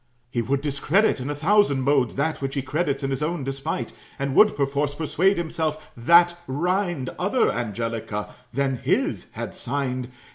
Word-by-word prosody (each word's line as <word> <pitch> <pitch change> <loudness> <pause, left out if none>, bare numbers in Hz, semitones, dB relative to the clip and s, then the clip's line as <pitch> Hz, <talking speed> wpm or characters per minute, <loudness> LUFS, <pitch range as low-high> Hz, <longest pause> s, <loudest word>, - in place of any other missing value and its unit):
He 120 - 0
would 135 +4 0
discredit 150 +7 +2
in 130 +3 -4
a 145 - -2
thousand 155 -4 +3
modes, 135 -4 +2
That 155 +3 -1
which 135 +1 -3
he 140 - -1
credits 140 0 -1
in 135 - -1
his 135 - -2
own 155 0 -1
despite; 135 0 -3 0.2
And 140 -1 -2
would 210 +7 +6
perforce 140 +1 0
persuade 175 +5 +2
himself, 160 -2 -3
that 170 +8 +5
rind 175 -1 -1
Other 200 +8 +2
Angelica 115 -2 -3 0.2
than 135 0 0
his - - 0
had - - -5
signed. 130 -1 -3
140 Hz, 160 wpm, -24 LUFS, 130-165 Hz, 0.2 s, would